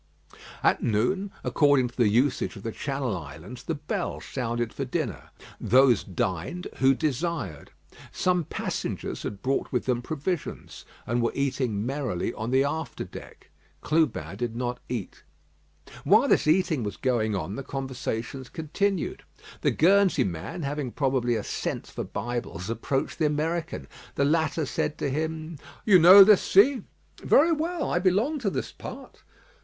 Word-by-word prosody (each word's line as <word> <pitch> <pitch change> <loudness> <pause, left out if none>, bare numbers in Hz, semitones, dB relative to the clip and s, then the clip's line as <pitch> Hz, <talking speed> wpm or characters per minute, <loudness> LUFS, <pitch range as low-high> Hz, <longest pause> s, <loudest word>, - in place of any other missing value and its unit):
At - - +3
noon, 125 - 0
according 145 -5 +3
to 120 - -20
the 120 -4 +3
usage 120 +6 +1
of 100 - -10
the 115 - -3
Channel 135 -3 -2
Islands, 85 - -9
the 160 +4 -3
bell 150 +1 -3
sounded 120 -2 -3
for 140 - -3
dinner. 125 - -3 0.3
Those 130 -3 +4
dined 95 - -3
who 135 0 +4
desired. 145 - -2 0.4
Some 180 -3 +1
passengers - - -4
had 100 -1 -6
brought 135 +1 -1
with 125 - -1
them 125 -2 0
provisions, 155 +5 -4 0.2
and 120 +1 0
were 115 - +1
eating 125 -6 -1
merrily 125 -7 -2
on 110 +2 -4
the 130 +2 +3
after 150 +1 -3
deck. - - -12 0.3
Clubin 150 -10 0
did 120 0 -3
not 125 0 -3
eat. 120 -6 -5 0.8
While 215 - +5
this - - +3
eating 165 -3 +3
was 105 -2 -4
going 120 -6 0
on, 95 +1 -3
the - - -4
conversations 130 -1 -4
continued. 180 +4 -2 0.4
The - - +3
Guernsey 195 +3 +4
man, 90 - -5
having 140 -2 -3
probably 130 -3 +1
a 110 - -2
scent - - -3
for - - -6
Bibles, 115 -5 -4
approached 135 +7 -2
the 155 - +3
American. 160 +3 -2 0.3
The 140 - +2
latter 160 +1 +1
said 150 +1 -2
to 140 - -2
him: 160 +1 -3 0.3
"You 195 -4 +7
know 185 +4 +11
this 205 0 +6
sea?" 245 +6 +4 0.4
"Very 325 +4 +5
well; 330 +1 -1
I 175 - +2
belong 205 - +1
to 225 -6 0
this - - -4
part." - - -10
135 Hz, 150 wpm, -26 LUFS, 120-165 Hz, 0.8 s, know